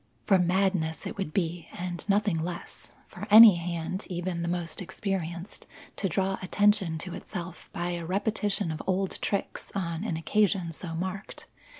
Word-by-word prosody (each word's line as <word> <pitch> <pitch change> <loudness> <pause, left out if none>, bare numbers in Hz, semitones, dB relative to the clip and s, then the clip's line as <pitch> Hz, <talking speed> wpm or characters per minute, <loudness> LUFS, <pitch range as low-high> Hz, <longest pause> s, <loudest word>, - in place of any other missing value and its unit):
For 195 - +5
madness 180 -2 +1
it - - -4
would 190 -6 -2
be 170 -1 -2
and 175 +2 -5
nothing 200 -4 +2
less, 170 +1 -5
for - - -8
any 215 -3 +10
hand, 170 +2 -3
even 175 -1 -3
the 170 - -2
most 170 -2 -2
experienced, 185 -1 -4 0.3
to 195 - -1
draw 195 +1 0
attention 195 -3 +2
to 175 +2 -6
itself 175 -3 -7
by 175 +1 -2
a 170 -1 -3
repetition 205 0 0
of 155 - -4
old 190 0 0
tricks 200 - -2
on 170 -2 -2
an 170 -8 -2
occasion 185 0 +1
so 165 0 -2
marked. 190 +3 -5
180 Hz, 160 wpm, -28 LUFS, 170-195 Hz, 0.3 s, any